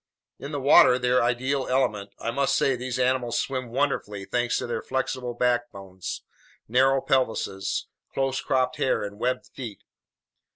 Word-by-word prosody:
In 140 - -7
the 145 - -2
water, 130 -2 +7
their 125 0 +2
ideal 130 +3 0
element, 115 -6 0
I 115 - -3
must 140 +3 +1
say 135 - +2
these 125 0 -4
animals 125 -2 +1
swim 130 -3 -2
wonderfully 110 -6 -1
thanks 120 +4 0
to - - -2
their 115 -2 -3
flexible 130 -2 -3
backbones, 120 -7 -2 0.4
narrow 130 +3 +3
pelvises, 110 -8 0 0.3
close 135 0 -1
cropped 130 -1 0
hair, 130 - +1
and 100 0 -7
webbed 125 +2 -2
feet. 115 -6 -8
125 Hz, 150 wpm, -26 LUFS, 115-130 Hz, 0.4 s, water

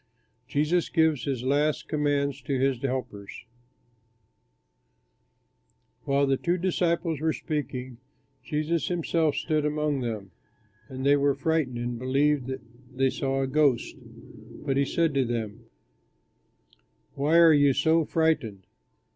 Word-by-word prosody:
JESUS 155 +4 0
GIVES 160 -6 +2
HIS 130 -4 -2
LAST 145 +3 0
COMMANDS 140 -2 0
TO 135 +1 -2
HIS 135 -2 +1
HELPERS 125 -8 -5 2.6
While 140 +1 +2
the 135 -1 +1
two 175 +5 0
disciples 170 -3 0
were 160 +1 +1
speaking, 130 -5 -5 0.4
Jesus 155 +3 -1
himself 165 -3 0
stood 155 -1 0
among 150 -1 0
them. 110 -5 -5 0.6
And 130 +2 -6
they 140 +1 +5
were 140 -1 +2
frightened 145 -4 -1
and 120 0 -4
believed 135 +1 +1
that 130 0 -5 0.3
they 130 +1 +1
saw 135 0 -1
a - - -1
ghost; 140 -2 +1 0.7
but 135 -2 0
he 140 +1 +2
said 165 +2 0
to 135 -1 +2
them, 115 -2 -4 1.5
"Why 150 +4 +2
are 165 -1 +7
you 145 -1 +5
so 160 +4 +2
frightened? 150 - 0
140 Hz, 125 wpm, -26 LUFS, 130-155 Hz, 2.6 s, are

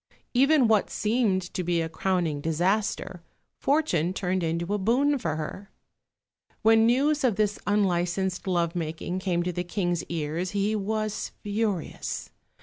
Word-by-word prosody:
Even 270 0 +5
what 215 -2 +3
seemed 210 -4 +1
to 180 - -2
be 175 -1 +1
a 165 - 0
crowning 165 -3 -1
disaster, 180 +3 0 0.4
fortune 230 - +1
turned 185 -1 -1
into 170 +3 -1
a 210 - 0
boon 265 +8 +2
for 160 -8 -2
her. 175 +6 -6 0.9
When 225 0 +6
news 285 +5 +2
of 240 -6 +3
this 210 0 0
unlicensed 190 -2 0
love 170 -2 +1
making 165 +2 -3
came 180 -2 0
to 180 0 -2
the 175 - -2
King's 175 -2 -1
ears, 165 +3 -3
he 205 +2 +1
was 215 +1 -2
furious. 205 -4 -2
190 Hz, 145 wpm, -27 LUFS, 175-215 Hz, 0.9 s, When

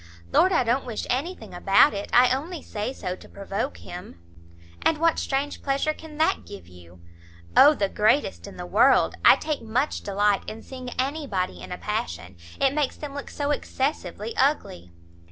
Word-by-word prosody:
"Lord, 375 - +5
I - - +3
don't 245 +3 +1
wish 225 -3 -4
anything 305 +9 -3
about - - +5
it! 200 0 -5
I 245 +1 +6
only 320 +4 -6
say 210 +4 -4
so 185 -8 -5
to - - -16
provoke 200 +7 -4
him." 175 - -10 0.6
"And 320 - +2
what 330 +1 +2
strange 280 +1 -2
pleasure 280 +2 0
can 310 -1 -12
that 315 - +1
give 90 0 -11
you?" 90 0 -16 0.5
"O 300 +2 +8
the 200 -6 0
greatest 215 +8 +1
in - - -11
the - - -6
world! - - +4
I - - +9
take 305 -2 -3
much 235 +6 -1
delight 205 0 +1
in 220 +1 -9
seeing 255 -1 -8
anybody 255 - -2
in 90 - -9
a - - -4
passion. 85 +3 -4 0.2
It 270 0 +3
makes 295 -3 0
them 290 -2 -7
look 285 0 -6
so 290 0 -2
excessively 230 - -3
ugly!" 200 - 0
255 Hz, 175 wpm, -25 LUFS, 195-290 Hz, 0.6 s, I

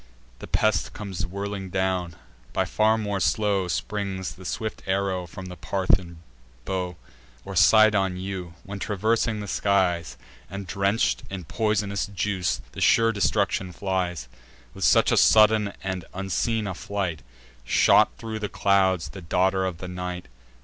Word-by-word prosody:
The - - -8
pest - - +1
comes 95 -4 -4
whirling 100 0 -5
down: 90 -2 -1 0.4
by - - +1
far 110 +1 +2
more 105 -3 -2
slow 100 0 +1
Springs 95 0 -3
the 95 - -13
swift 110 +4 -4
arrow 95 -2 -1
from 95 +3 -9
the 90 -1 -8
Parthian 90 -1 0 0.4
bow, 90 -2 -3 0.5
Or 100 0 -6
Cydon 95 0 +5
yew, 90 -3 -5
when, 100 0 -7
traversing 110 +2 0
the 105 - -6
skies, 90 -5 +1 0.3
And 100 +2 -6
drench'd 100 +4 +1
in 95 -2 -6
pois'nous 105 +1 -1
juice, 95 -2 -1
the - - -8
sure 115 0 +5
destruction 95 -3 0
flies. 90 -8 -2 0.5
With - - -2
such - - +5
a - - +3
sudden 110 -1 +5
and 95 -3 -3
unseen 105 +4 -1
a 95 - -3
flight 90 -5 -3 0.4
Shot 60 - +5
thro' 110 -1 -5
the 105 -1 -3
clouds 95 -3 +2
the 95 - -9
daughter 95 +3 +1
of 90 -3 -3
the 90 - -7
night. 90 0 -5
95 Hz, 145 wpm, -25 LUFS, 90-100 Hz, 0.5 s, Cydon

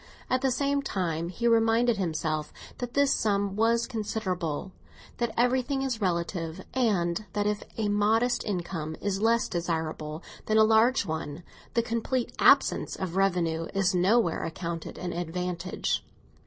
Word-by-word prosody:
At 255 0 +2
the 270 - +2
same 280 +2 +1
time 170 - -2
he 235 +6 -1
reminded 230 0 +3
himself 155 -4 -2 0.3
that 245 -1 -5
this 280 -1 +4
sum 200 -2 0
was 230 +2 +2
considerable, 190 -7 -3 0.5
that 235 -1 0
everything 255 +3 +2
is 250 -5 -2
relative, 170 -2 -2
and 205 -7 +1
that 205 0 0
if 210 0 0 0.2
a 220 -2 0
modest 220 +4 +2
income 170 -5 -3
is 200 -1 -2
less 230 +1 +3
desirable 160 -2 -3 0.2
than 215 - +3
a 220 - +7
large 220 +2 +4
one, 160 -1 -4 0.3
the 235 - +3
complete 235 +2 -1
absence - - +4
of 185 -2 -4
revenue 170 -4 +1
is 195 0 +2
nowhere 185 0 +2
accounted 165 0 -5
an 180 -1 -4
advantage. 175 +1 -2
200 Hz, 140 wpm, -28 LUFS, 170-230 Hz, 0.5 s, a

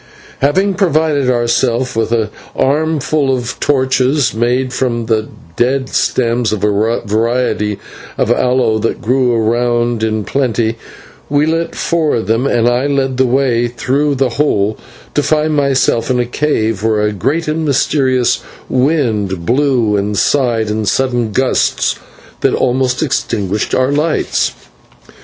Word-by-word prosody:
Having 190 +9 +2
provided 155 -7 +1
ourselves 120 +1 0
with 115 0 -1
an 110 -2 +1 0.3
armful 150 0 +1
of 120 -1 -5
torches 130 0 +1
made 125 +3 0
from 120 -3 -1
the 110 -1 0 0.3
dead 130 +2 0
stems 120 -2 0
of 110 -2 -3
a 105 +3 +1
variety 110 -1 0 0.4
of - - +1
aloe 125 -3 +2
that 115 - -2
grew 125 +1 +1
around 120 0 0
in 110 -1 -1
plenty, 120 -4 0 0.5
we 145 +1 +2
lit 165 +1 -1
four 165 -3 0
of 115 - -2
them, 115 +6 +1
and 120 -3 +2
I 120 +3 +1
led 135 -2 0
the 130 0 +3
way 120 -2 +1
through 135 +4 -1
the 135 -1 +1
hole 110 -6 0 0.3
to 145 - +2
find 155 +1 +1
myself 135 -4 +1
in 125 -1 +1
a 120 - +1
cave 115 -6 -1
where 110 -1 +1
a 105 - +1
great 140 - -1
and 155 +1 -1
mysterious 135 -3 +1 0.3
wind 115 - 0
blew 125 -3 +2
and 100 +1 -2
sighed 115 -2 +1
in 110 -1 -2
sudden 120 0 0
gusts 130 +4 0 0.4
that - - +1
almost 125 +2 0
extinguished 105 -7 -1
our 130 +1 +1
lights. 155 +2 0
125 Hz, 140 wpm, -14 LUFS, 115-140 Hz, 0.5 s, the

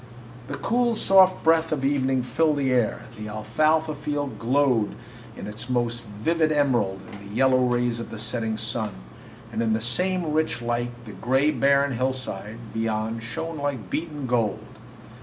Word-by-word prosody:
The - - -5
cool, 240 0 +1
soft 190 -3 +5
breath 165 0 +3
of 140 -3 0
evening 135 -2 +1
filled 150 +4 +1
the 135 -2 +1
air, 120 -4 +1 0.2
the 105 - -5
alfalfa 155 +9 +1
field 145 -1 -3
glowed 125 -3 +2 0.4
its 110 +4 -6
most 120 -1 0
vivid 155 +10 0
emerald 120 -10 +1
in 100 - -9
the 105 - -9
yellow 130 +1 +4
rays 120 -1 +1
of 115 - -6
the - - -7
setting 110 0 -2
sun, 110 -2 -1 0.6
and - - -1
in 110 -1 +2
the 110 - +1
same 180 +8 0
rich 155 -4 +1
light 120 0 -3
the 110 - -8
gray, 130 +9 +2
barren 140 -1 +3
hillside 120 -4 -3 0.2
beyond 110 0 -1
shone 155 +7 -5
like 140 -6 -3
beaten 150 -4 -3
gold. 115 -4 0
125 Hz, 160 wpm, -25 LUFS, 115-150 Hz, 0.6 s, soft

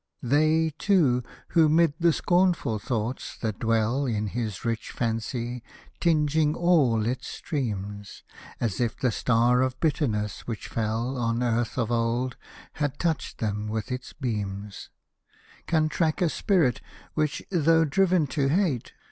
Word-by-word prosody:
They, 155 +5 +3
too, 155 -12 +3 0.3
who, 160 -2 +4
'mid 165 -1 +4
the 170 0 +4
scornful 175 - +1
thoughts 115 +3 -3
that 110 -3 -3
dwell 115 +4 +1
In 105 -3 -1
his 110 -2 -4
rich 115 0 -2
fancy, 120 +1 -3 0.4
tinging 155 -2 +2
all 145 -12 +3
its 125 +2 -2
streams, 105 - -4 0.2
— - - -16
As 115 -6 -1
if 120 -2 -1
the 125 - +1
Star 120 +2 +3
of 130 0 -1
Bitterness, 110 - -1
which 115 -3 -5
fell 115 +4 -2
On 115 +1 0
earth 120 0 0
of 120 -2 0
old, 120 +2 0 0.4
had 145 -2 -2
touched 165 -4 -2
them 105 -1 -2
with 110 +2 -3
its 125 0 -5
beams, 105 -6 -4 0.4
— - - -28
Can 155 -2 +2
track 155 0 0
a 175 - +2
spirit, 155 - +1 0.3
which, 155 -2 -1
though 165 -2 +4
driven 180 +1 +3
to 140 0 0
hate. 155 - 0
125 Hz, 145 wpm, -26 LUFS, 115-155 Hz, 0.4 s, who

